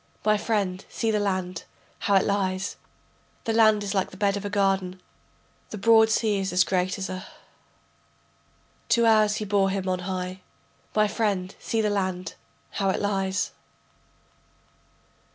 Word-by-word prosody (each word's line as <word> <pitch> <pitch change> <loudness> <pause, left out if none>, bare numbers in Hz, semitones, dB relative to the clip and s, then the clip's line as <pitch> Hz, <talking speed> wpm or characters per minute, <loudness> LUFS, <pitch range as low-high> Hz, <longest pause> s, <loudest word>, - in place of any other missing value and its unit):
My 215 0 +4
friend 205 -3 -1
see 225 -1 -1
the 210 - +1
land, 185 -3 -2 0.3
how 200 - +1
it 190 - +4
lies, 195 -1 -1 0.7
The 225 - -1
land 215 -2 +4
is 200 0 -3
like 190 -2 0
the 185 - -13
bed 200 0 +1
of 200 - -4
a 205 - -3
garden, 195 -2 0 0.7
The 215 - -6
broad 220 +1 +5
sea 220 -2 +1
is 195 0 -2
as 180 +1 +4
great 185 0 0
as 195 0 -3
a 185 +1 -6 0.9
[.] - - -37
Two 235 -1 +4
hours 215 -2 +4
he 215 - -3
bore 200 -1 +2
him 190 -1 -2
on 185 -1 0
high. 185 0 -4 0.5
My 215 0 +4
friend 200 -3 -1
see 225 - -1
the 210 -1 +1
land, 185 -3 -2 0.4
how 195 -1 0
it - - 0
lies. 195 -1 -1
195 Hz, 160 wpm, -25 LUFS, 185-210 Hz, 0.9 s, broad